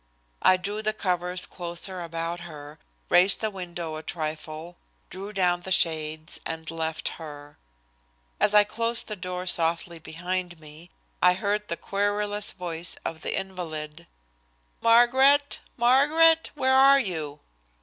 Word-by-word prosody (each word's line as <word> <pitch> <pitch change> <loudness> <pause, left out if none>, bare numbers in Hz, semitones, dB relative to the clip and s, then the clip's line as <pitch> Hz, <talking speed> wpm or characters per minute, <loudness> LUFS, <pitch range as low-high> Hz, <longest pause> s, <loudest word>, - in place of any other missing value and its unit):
I 185 - +5
drew 205 +3 -4
the 215 0 0
covers 180 -2 -1
closer 175 +1 -2
about 165 0 -4
her, 150 -2 -10 0.3
raised 180 +3 +6
the 220 -1 -1
window 175 -4 -6
a - - -6
trifle, 155 +1 -6 0.3
drew 195 +3 -7
down 180 -3 +1
the 190 - -7
shades, 155 -2 0
and 160 0 -5
left 160 -1 -3
her. 145 -2 -10 0.8
As 210 - +3
I 210 - +8
closed 230 +3 -2
the 215 - -4
door 180 -1 -5
softly 170 -1 0
behind 175 +2 -4
me, 155 +3 -13 0.3
I 180 0 +5
heard 210 +2 -1
the 170 - -3
querulous 205 +1 -1
voice 175 -1 -5
of 160 -1 -4
the - - -2
invalid: 170 -4 -7 0.7
"Margaret! 265 +5 +5 0.2
Margaret! 300 +7 +4
Where 265 -2 +2
are 275 +1 +7
you?" 155 - -4
180 Hz, 135 wpm, -26 LUFS, 165-210 Hz, 0.8 s, I